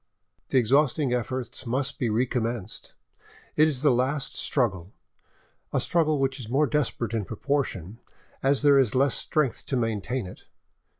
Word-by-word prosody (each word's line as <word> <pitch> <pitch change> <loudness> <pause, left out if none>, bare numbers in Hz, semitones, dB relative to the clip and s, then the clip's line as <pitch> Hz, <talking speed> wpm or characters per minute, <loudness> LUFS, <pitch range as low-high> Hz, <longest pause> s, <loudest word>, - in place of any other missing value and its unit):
The - - +2
exhausting 135 +2 +2
efforts 125 +1 -4
must 135 +5 -1
be 120 -5 0
recommenced; 115 -2 -2 0.6
it 155 +1 +5
is 140 -3 -1
the 145 - +5
last 135 +4 0
struggle—a 95 - -4
struggle 155 -3 +2
which 135 0 -1
is 115 -4 -8
more 140 +5 +3
desperate 135 -6 -1
in 110 -2 0
proportion 110 - -3 0.4
as 135 +1 +2
there 140 -1 +6
is 130 -4 +2
less 135 0 +3
strength 150 -6 0
to 135 - 0
maintain 115 +1 -2
it. 90 - -11
130 Hz, 140 wpm, -26 LUFS, 115-140 Hz, 0.6 s, there